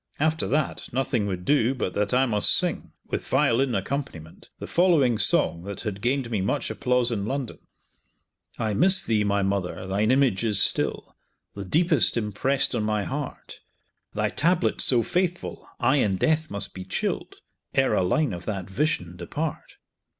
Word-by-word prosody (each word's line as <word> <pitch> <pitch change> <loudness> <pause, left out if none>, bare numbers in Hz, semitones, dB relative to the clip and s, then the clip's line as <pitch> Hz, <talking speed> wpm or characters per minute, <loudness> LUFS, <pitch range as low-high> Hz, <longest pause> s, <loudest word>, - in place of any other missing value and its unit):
After 155 +2 +1
that 155 0 -2
nothing 125 -4 -1
would 90 -2 -4
do 135 -3 +2
but 110 -7 -3
that 105 0 -1
I 130 +1 +3
must 105 -5 +3
sing, - - -1
with - - -4
violin 125 +1 +2
accompaniment, 110 - -5
the - - -7
following 155 - +3
song 85 - +2
that 100 -1 -6
had 105 -3 -5
gained 125 0 -1
me 105 -4 0
much 135 +9 -1
applause 125 -2 +1
in 105 -3 -2
London: 135 -2 -4 1.0
I 110 -2 -1
miss 185 - +4
thee, 110 -2 +1
my 100 -1 +1
mother, 95 -1 -2
thine 100 +3 0
image 130 -5 +2
is 105 -4 +2
still - - 0 0.4
The 100 -1 -7
deepest 160 - +2
impressed 115 +7 0
on 120 - 0
my 105 -1 -1
heart; 140 +3 -6 0.6
Thy - - 0
tablet 175 +3 +1
so 120 -3 +5
faithful, 175 - -3
I 130 +3 +3
in 105 -8 +1
death 155 +8 +1
must 100 - -2
be 95 - -7
chilled, 95 - -3 0.4
'Ere - - +3
a - - +2
line 125 +7 +1
of 85 0 -7
that 95 -4 -4
vision 95 - -2
depart. 155 - -5
120 Hz, 165 wpm, -25 LUFS, 100-140 Hz, 1.0 s, so